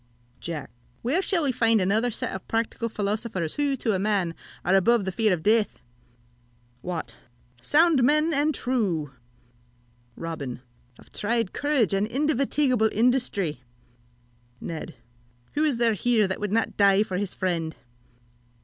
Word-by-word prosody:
Jack. 160 Hz, -8 st, -6 dB, 0.3 s
Where 280 Hz, +11 st, +1 dB
shall 370 Hz, -4 st, 0 dB
we 275 Hz, -, +2 dB
find 230 Hz, -2 st, +3 dB
such -, -, +2 dB
another 215 Hz, +6 st, +2 dB
set 230 Hz, -, -3 dB
of 190 Hz, -, -7 dB
practical 230 Hz, +1 st, -1 dB
philosophers, 205 Hz, -5 st, -2 dB
who, 285 Hz, -2 st, 0 dB
to 225 Hz, -3 st, 0 dB
a 190 Hz, -, 0 dB
man, 195 Hz, -4 st, 0 dB, 0.3 s
are 185 Hz, -, +3 dB
above 220 Hz, +2 st, +3 dB
the 190 Hz, -, -2 dB
fear 215 Hz, +2 st, +1 dB
of 170 Hz, -3 st, -1 dB
death! 215 Hz, 0 st, +2 dB, 1.0 s
Wat. 175 Hz, 0 st, -5 dB, 0.4 s
Sound 310 Hz, -, +4 dB
men 305 Hz, +5 st, +3 dB
and 295 Hz, +1 st, +2 dB
true! 185 Hz, -, -1 dB, 1.0 s
Robin. 140 Hz, -7 st, -6 dB, 0.3 s
Of -, -, -19 dB
tried 230 Hz, -1 st, -1 dB
courage 285 Hz, -8 st, +1 dB
and 195 Hz, +2 st, +1 dB
indefatigable 265 Hz, -2 st, +1 dB
industry! 220 Hz, -, +1 dB, 1.0 s
Ned. 165 Hz, -1 st, -6 dB, 0.6 s
Who 300 Hz, -, +1 dB
is 295 Hz, -6 st, +2 dB
there 230 Hz, -1 st, +3 dB
here 220 Hz, 0 st, +2 dB
that 190 Hz, -, -3 dB
would 210 Hz, -1 st, -3 dB
not 225 Hz, +1 st, 0 dB
die 200 Hz, 0 st, +5 dB
for 185 Hz, -4 st, -4 dB
his 195 Hz, -1 st, -3 dB
friend? 165 Hz, -4 st, -2 dB
220 Hz, 145 wpm, -25 LUFS, 185-250 Hz, 1.0 s, die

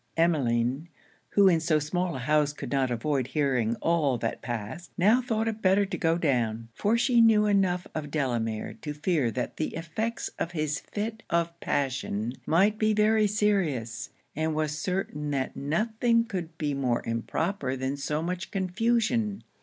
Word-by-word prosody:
Emmeline, 135 Hz, -2 st, +1 dB, 0.4 s
who 200 Hz, -1 st, +5 dB
in 170 Hz, -3 st, +5 dB
so 160 Hz, -1 st, +2 dB
small 175 Hz, +3 st, -1 dB
a 130 Hz, -1 st, -5 dB
house 150 Hz, -1 st, +3 dB
could -, -, -7 dB
not 135 Hz, -2 st, +1 dB
avoid 130 Hz, +2 st, -1 dB
hearing 130 Hz, -6 st, +1 dB
all 155 Hz, -6 st, +2 dB
that -, -, -3 dB
passed, 120 Hz, +8 st, -5 dB
now 215 Hz, +7 st, +5 dB
thought 225 Hz, -3 st, -1 dB
it 220 Hz, -1 st, -3 dB
better 195 Hz, +2 st, +4 dB
to 195 Hz, -, -4 dB
go 165 Hz, 0 st, +1 dB
down; 115 Hz, -8 st, 0 dB
for 215 Hz, -, +1 dB
she 240 Hz, 0 st, +4 dB
knew 220 Hz, -2 st, +5 dB
enough 190 Hz, -3 st, +2 dB
of 150 Hz, -2 st, -4 dB
Delamere 120 Hz, -7 st, -1 dB
to 150 Hz, -1 st, -5 dB
fear 150 Hz, -5 st, +1 dB
that 125 Hz, +2 st, -4 dB
the 155 Hz, -, -2 dB
effects 170 Hz, +9 st, -3 dB
of 170 Hz, -, -2 dB
his 155 Hz, -3 st, -1 dB
fit 220 Hz, +2 st, -5 dB
of 170 Hz, 0 st, +1 dB
passion 125 Hz, -5 st, -1 dB
might 200 Hz, +6 st, +3 dB
be 215 Hz, 0 st, +3 dB
very 215 Hz, 0 st, +4 dB
serious; 180 Hz, -, 0 dB, 0.3 s
and 155 Hz, +1 st, -1 dB
was 155 Hz, -1 st, -1 dB
certain 155 Hz, -3 st, -2 dB
that 135 Hz, -2 st, -2 dB
nothing 225 Hz, -, +1 dB
could 175 Hz, -7 st, -5 dB
be 150 Hz, -2 st, -1 dB
more 130 Hz, -4 st, 0 dB
improper 130 Hz, -, -2 dB
than 130 Hz, +2 st, -2 dB
so 150 Hz, +2 st, -2 dB
much 180 Hz, +3 st, -3 dB
confusion. 220 Hz, +2 st, 0 dB
160 Hz, 165 wpm, -27 LUFS, 135-200 Hz, 0.4 s, who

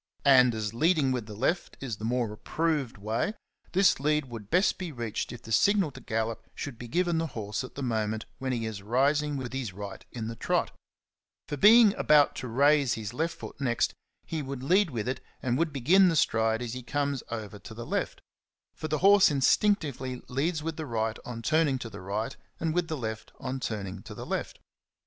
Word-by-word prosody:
And 125 Hz, -4 st, +6 dB
as 110 Hz, -1 st, -3 dB
leading 155 Hz, +1 st, +3 dB
with 125 Hz, -4 st, -2 dB
the 105 Hz, -, -8 dB
left 160 Hz, -, -1 dB
is 120 Hz, -6 st, -4 dB
the 110 Hz, -, -5 dB
more 120 Hz, -2 st, 0 dB
approved 150 Hz, +2 st, -1 dB
way, 110 Hz, -, -1 dB, 0.4 s
this 190 Hz, -4 st, +4 dB
lead 150 Hz, +1 st, +1 dB
would 115 Hz, -5 st, -9 dB
best 180 Hz, +5 st, +3 dB
be 180 Hz, -3 st, -4 dB
reached 115 Hz, -5 st, -4 dB
if 120 Hz, -, -9 dB
the 115 Hz, -, -9 dB
signal 195 Hz, -, +3 dB
to -, -, -11 dB
gallop 115 Hz, 0 st, -3 dB
should 125 Hz, -5 st, -6 dB
be 120 Hz, -, -7 dB
given 175 Hz, +4 st, +1 dB
the 165 Hz, -, -1 dB
horse 105 Hz, +3 st, -3 dB
at 130 Hz, -, -10 dB
the 140 Hz, -, -4 dB
moment 110 Hz, -3 st, -1 dB
when 130 Hz, 0 st, -2 dB
he 115 Hz, -3 st, -1 dB
is 110 Hz, -3 st, -5 dB
rising 140 Hz, +7 st, +1 dB
with 130 Hz, -2 st, -5 dB
his 130 Hz, -8 st, -3 dB
right 100 Hz, +1 st, -7 dB
in 115 Hz, -3 st, -5 dB
the 115 Hz, -, -5 dB
trot; -, -, 0 dB, 0.8 s
for, -, -, -3 dB
being 215 Hz, -, +7 dB
about 150 Hz, -1 st, +5 dB
to 130 Hz, -, -4 dB
raise 140 Hz, +2 st, +3 dB
his 110 Hz, -1 st, -5 dB
left 160 Hz, +5 st, -1 dB
foot -, -, -9 dB
next, 120 Hz, -3 st, +1 dB, 0.3 s
he 160 Hz, -2 st, -3 dB
would 135 Hz, -2 st, -6 dB
lead 185 Hz, +6 st, +3 dB
with 120 Hz, -4 st, -3 dB
it 130 Hz, 0 st, -2 dB, 0.2 s
and 125 Hz, +1 st, 0 dB
would 165 Hz, -1 st, +1 dB
begin 175 Hz, +8 st, +5 dB
the 165 Hz, -, +1 dB
stride 115 Hz, -4 st, +2 dB
as 120 Hz, -1 st, -4 dB
he 125 Hz, -, -5 dB
comes 140 Hz, +1 st, -1 dB
over 105 Hz, -3 st, -6 dB
to 110 Hz, -, -11 dB
the 120 Hz, +1 st, -7 dB
left, -, -, -2 dB, 0.3 s
— -, -, -65 dB
for 155 Hz, -, -5 dB
the 155 Hz, 0 st, 0 dB
horse 200 Hz, 0 st, +7 dB
in 145 Hz, -2 st, 0 dB
stinctively 135 Hz, -, +1 dB
leads 155 Hz, +5 st, -1 dB
with 165 Hz, -1 st, -3 dB
the 155 Hz, -2 st, -4 dB
right 110 Hz, -2 st, -1 dB
on 115 Hz, -2 st, -6 dB
turning 155 Hz, -1 st, +2 dB
to 115 Hz, -3 st, -7 dB
the 105 Hz, -, -9 dB
right, 100 Hz, +4 st, -3 dB, 0.2 s
and 160 Hz, -1 st, 0 dB
with 175 Hz, 0 st, 0 dB
the 160 Hz, -2 st, -3 dB
left 110 Hz, -3 st, -5 dB
on 130 Hz, +1 st, -4 dB
turning 105 Hz, -6 st, -4 dB
to -, -, -10 dB
the -, -, -7 dB
left. -, -, -3 dB
130 Hz, 215 wpm, -28 LUFS, 115-155 Hz, 0.8 s, being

